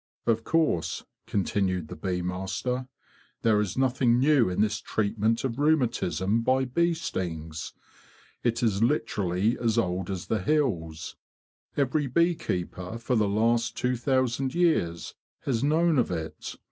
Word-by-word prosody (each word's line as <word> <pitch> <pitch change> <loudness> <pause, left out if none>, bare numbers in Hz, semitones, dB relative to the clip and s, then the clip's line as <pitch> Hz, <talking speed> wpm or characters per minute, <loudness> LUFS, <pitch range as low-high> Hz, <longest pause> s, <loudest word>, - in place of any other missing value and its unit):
"Of 115 -1 +1
course,'' 160 - +1 0.2
continued 95 -4 0
the - - -8
bee 90 +2 -2
master, 95 +8 -3 0.3
'' - - -33
there 110 -2 +4
is 100 0 -3
nothing 130 -2 +3
new 135 -4 +4
in 90 - -3
this 105 0 +2
treatment 110 +2 0
of 130 -1 -2
rheumatism 115 - +1
by 130 +2 +2
bee 170 +7 +1
stings. 80 - -4 0.7
It 120 0 0
is 105 -3 +1
literally 105 -5 +1
as 115 -2 +1
old 90 -4 0
as 95 -2 -4
the 110 -3 -1
hills. 90 - -1 0.6
Every 140 +1 +1
bee 170 +7 +3
keeper 90 - -4
for 120 +2 -1
the 105 -3 +2
last 115 +2 +1
two 125 0 +1
thousand 130 +1 0
years 85 - +1 0.3
has 125 -3 -1
known 160 +1 +3
of 120 - +1
it. 80 -1 -5
115 Hz, 145 wpm, -27 LUFS, 95-130 Hz, 0.7 s, there